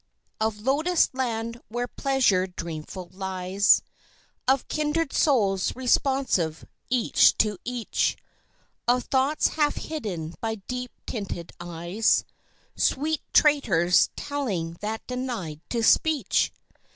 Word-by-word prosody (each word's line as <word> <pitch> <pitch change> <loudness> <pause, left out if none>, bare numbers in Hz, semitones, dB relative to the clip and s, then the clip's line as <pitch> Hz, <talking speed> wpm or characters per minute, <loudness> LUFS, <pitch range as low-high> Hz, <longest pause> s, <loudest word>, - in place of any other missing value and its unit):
Of 220 -1 -1
Lotus 310 +8 +2
land 235 -2 -3
where 240 +2 -3
pleasure 245 -10 +2
dreamful 170 0 -7
lies, 190 +1 +2 0.6
Of 265 0 +2
kindred 305 0 -1
souls 200 -10 +2
responsive 255 - +1 0.2
each 245 -2 +4
to 210 -3 +1
each, 245 -2 -1 0.7
Of 250 +1 +3
thoughts 270 +3 +2
half 295 -1 +1
hidden 185 - -5
by 225 -1 -1
deep 250 +5 -5 0.2
tinted 195 -6 -5
eyes 175 +5 0 0.5
(Sweet 310 +2 +1
traitors 195 - +4
telling 215 - -3
that 220 +1 -4
denied 240 - -4
to 235 -2 -1
speech!) 310 +5 +3
230 Hz, 105 wpm, -26 LUFS, 185-270 Hz, 0.7 s, each